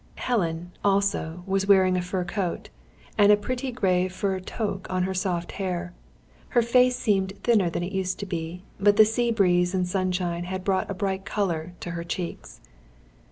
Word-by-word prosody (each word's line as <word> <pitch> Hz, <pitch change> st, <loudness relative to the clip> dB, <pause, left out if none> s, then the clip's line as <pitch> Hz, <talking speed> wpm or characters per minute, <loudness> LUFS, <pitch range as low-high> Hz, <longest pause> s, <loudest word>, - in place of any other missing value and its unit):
Helen, 175 Hz, -7 st, -1 dB
also, 195 Hz, -4 st, +1 dB
was 195 Hz, 0 st, 0 dB
wearing 190 Hz, -2 st, +5 dB
a 180 Hz, -, +1 dB
fur 180 Hz, +1 st, -2 dB
coat, 175 Hz, 0 st, -3 dB, 0.5 s
and 205 Hz, 0 st, +7 dB
a 210 Hz, -, +6 dB
pretty 255 Hz, +5 st, -3 dB
grey 185 Hz, -6 st, +1 dB
fur 190 Hz, +1 st, -2 dB
toque 195 Hz, 0 st, -4 dB
on 185 Hz, -1 st, 0 dB
her 190 Hz, +1 st, -1 dB
soft 180 Hz, -2 st, -2 dB
hair. 180 Hz, -1 st, -3 dB, 0.6 s
Her 240 Hz, -, +6 dB
face 250 Hz, +2 st, +4 dB
seemed 195 Hz, -5 st, +1 dB
thinner 210 Hz, -7 st, +3 dB
than 170 Hz, -, -3 dB
it 180 Hz, -, -4 dB
used 190 Hz, -2 st, -1 dB
to -, -, -3 dB
be; 175 Hz, -1 st, -5 dB, 0.2 s
but 205 Hz, +1 st, +4 dB
the 215 Hz, -, +9 dB
sea 235 Hz, +2 st, 0 dB
breeze 180 Hz, -4 st, +2 dB
and 180 Hz, -1 st, +1 dB
sunshine 180 Hz, -2 st, -1 dB
had 185 Hz, +1 st, -4 dB
brought 190 Hz, -1 st, 0 dB
a 200 Hz, -, -3 dB
bright 190 Hz, 0 st, -2 dB
colour 175 Hz, -5 st, -2 dB
to 175 Hz, -, -5 dB
her 170 Hz, 0 st, -4 dB
cheeks. 175 Hz, 0 st, -6 dB
190 Hz, 180 wpm, -26 LUFS, 180-200 Hz, 0.6 s, the